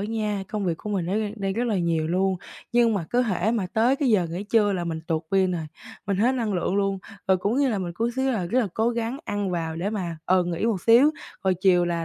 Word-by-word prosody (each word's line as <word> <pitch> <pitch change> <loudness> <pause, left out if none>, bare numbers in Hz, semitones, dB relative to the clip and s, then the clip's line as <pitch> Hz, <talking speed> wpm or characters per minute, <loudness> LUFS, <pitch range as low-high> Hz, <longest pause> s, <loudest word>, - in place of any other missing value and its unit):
á 205 - -2
nha, 210 -3 -2
công 210 -2 -3
việc 170 -3 0
của 210 - -6
mình 185 -4 -1
nó 185 - -2
đang 210 -1 -1
đang 195 -1 -2
rất 235 +4 -1
là 210 -5 +1
nhiều 165 -2 0
luôn. 185 +2 +1 0.4
Nhưng 235 -2 +4
mà 180 -5 -1
cứ 245 +1 +3
hễ 205 -2 0
mà 225 -5 0
tới 240 +5 +3
cái 280 -3 0
giờ 195 -7 +3
nghỉ 180 +5 -4
trưa 210 -1 +3
là 175 -2 -2
mình 160 -1 -3
tụt 165 -2 -1
pin 190 -1 +3
rồi, 165 -3 -3 0.4
mình 200 -1 0
hết 235 +6 +3
năng 225 -5 -1
lượng 180 +1 0
luôn. 195 -1 +1 0.3
Rồi 190 - +5
cũng 205 +6 -1
như 275 -1 +3
là 215 - 0
mình 175 -2 -4
cố 230 +5 0
xíu 265 0 +1
là 200 -8 -1
rất 245 +9 +2
là 225 - 0
cố 225 +1 +2
gắng 235 +3 -3
ăn 205 -2 -2
vào 165 -2 -2
để 185 +5 -2
mà, 180 -6 -3
ừ, 185 0 +3
nghỉ 175 +3 -2
một 205 -6 0
xíu, 240 +6 +6 0.3
rồi 190 -1 +3
chiều 180 -1 +3
là 170 -1 -1
195 Hz, 280 wpm, -25 LUFS, 180-225 Hz, 0.4 s, xíu